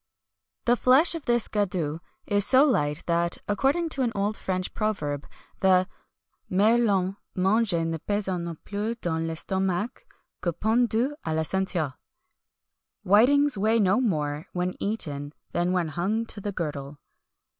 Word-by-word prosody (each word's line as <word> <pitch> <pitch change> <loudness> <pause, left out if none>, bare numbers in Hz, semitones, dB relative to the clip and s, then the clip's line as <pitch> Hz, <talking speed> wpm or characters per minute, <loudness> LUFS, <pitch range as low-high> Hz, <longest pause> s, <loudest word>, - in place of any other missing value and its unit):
The 240 - +4
flesh 260 +8 +4
of 330 -4 -7
this 240 -2 +3
gadus 180 -7 -1 0.3
is 205 -1 +2
so 265 +7 +7
light 150 - 0
that, 170 0 0
according 275 +11 +1
to 275 - 0
an 240 -3 +1
old 205 +2 0
French 185 -2 -3
proverb, 150 -10 -2 0.3
the 185 -1 +4 0.6
"Merlans 200 -2 +2 0.2
mangée 190 -3 +2
ne 165 0 -2
pèsant 195 -1 -2
non 170 -2 -6
plus 210 +3 -3
dans 170 -8 -2
l'estomac 190 - -2 0.3
que 175 - -1
pendus 230 - +1
à 160 -1 -2
la 160 - +1
ceinture."[XXI 175 -5 -1 1.1
152] - - -11
"Whitings 280 +5 +5
weigh 220 +3 +3
no 200 +4 +3
more 155 - -1
when 180 0 -1
eaten 145 -9 -3 0.2
than 175 +1 0
when 180 -3 0
hung 195 +9 -1
to 210 - -6
the 205 - -3
girdle." 145 -5 -5
190 Hz, 145 wpm, -26 LUFS, 170-225 Hz, 1.1 s, so